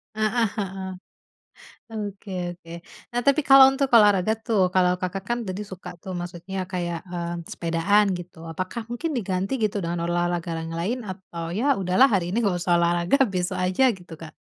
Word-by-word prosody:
Heeh 220 +1 +1
heeh. 190 -1 -4 1.0
Oke 205 -2 -6 0.2
oke. 170 -1 -18 0.4
Nah 245 +1 0
tapi 280 +2 +4
kalau 270 0 +10
untuk 270 -1 0
olahraga 205 -1 +4
tuh, 195 -6 +2
kalau 180 -1 +4
Kakak, 185 +1 -3
kan 240 0 0
tadi 185 +3 -4
suka 190 -2 -9
tuh 190 - -6
maksudnya 175 +2 -6
kayak 175 -2 -2
mmm, 170 -1 -4
sepedaan 170 +5 +2
gitu, 175 0 -11
apakah 185 +7 -4
mungkin 275 +8 -3
diganti 190 +1 -2
gitu 205 -1 0
dengan 170 0 -2
olahraga 175 0 -1
yang 165 - -6
lain 225 +9 -1
atau 175 -3 -6
ya 280 +4 +3
udahlah 185 +9 +5
hari 175 -3 +1
ini 205 - -2
enggak 180 -3 +1
usah 175 -1 +3
olahraga 170 +7 +2 0.2
besok 180 -1 -1
aja 185 +8 +1
gitu 175 -2 -13
Kak? 155 -1 -9
185 Hz, 170 wpm, -24 LUFS, 175-215 Hz, 1.0 s, kalau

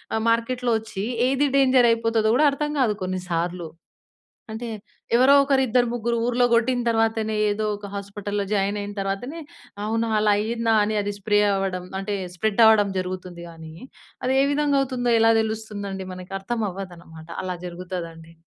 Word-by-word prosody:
ఆహ్, 220 - -1
మార్కెట్‍లో 240 +1 0
వచ్చి 215 -3 -6 0.2
ఏది 270 +2 +2
డేంజర్ 260 -3 +5
అయిపోతుందో 225 -1 +1
గూడా 305 - +4
అర్థం 295 +1 -2
కాదు 220 -4 +2
కొన్నిసార్లు. 180 -2 -3 0.9
అంటే 230 +2 -5 0.5
ఎవరో 260 +3 +6
ఒకరు, 275 -1 +2
ఇద్దరు, 245 +1 +2
ముగ్గురు 235 0 -1
ఊర్లో 245 0 +2
కొట్టిన 245 +2 +2
తర్వాతనే 225 -1 +1
ఏదో 210 +1 -2
ఒక 205 0 -9
హాస్పటల్లో 200 0 -4
జాయిన్ 200 0 0
అయిన 205 0 -5
తర్వాతనే 200 +11 -4 0.4
అవునా! 225 +2 -1
అలా 210 0 +3
అయ్యిందా! 225 +1 0
అని 215 +1 -1
అది 205 0 -3
స్ప్రే 205 +1 +2
అవ్వడం 190 -2 -2
అంటే 200 +1 -3 0.2
స్ప్రెడ్ 220 +4 +1
అవ్వడం 210 -2 +5
జరుగుతుంది 180 -1 -5
గానీ, 160 -1 -11 0.5
అది 260 - +1
ఏ - - +3
విధంగా 290 -1 +2
అవుతుందో 245 -3 -1
ఎలా 225 0 +5
తెలుస్తుందండి. 205 -3 -5
మనకు 185 +1 -9
అర్థమవ్వదనమాట. 185 -7 -6
అలా 185 -1 -3
జరుగుతుందండి. 170 -2 -7
215 Hz, 150 wpm, -23 LUFS, 190-235 Hz, 0.9 s, ఎవరో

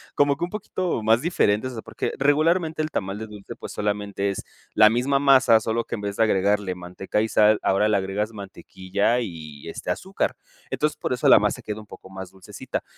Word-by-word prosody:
como 145 -1 +3
que - - -4
un - - -10
poquito 185 - -3
más 115 +3 +4
diferentes, 130 - +1
o - - -9
sea, 110 - -5
porque - - -4
regularmente 155 +3 +2
el 155 - -3
tamal 95 -4 -3
de 110 - -5
dulce, 105 -2 -10
pues, - - -9
solamente 100 -1 -2
es 100 - -4 0.3
la 105 0 +7
misma 130 +5 +1
masa 130 -5 +5
solo 115 +1 -1
que - - -4
en 105 - -7
vez 100 -1 -4
de 115 - +4
agregarle 100 -2 +1
manteca 90 +4 -3
y 110 - 0
sal, 105 0 +4
ahora 100 +2 +2
le 105 - +3
agregas 100 +3 -2
mantequilla 100 +2 -2
y, 80 -7 -8
este, 90 - -4
azúcar. 190 - -2 0.3
Entonces 150 0 -1
por - - -4
eso 125 - 0
la - - +8
masa 105 0 -1
queda 105 0 -5
un 105 - -16
poco 95 - -13
más 95 -1 -8
dulcecita. 95 -1 -6
105 Hz, 215 wpm, -24 LUFS, 100-130 Hz, 0.3 s, la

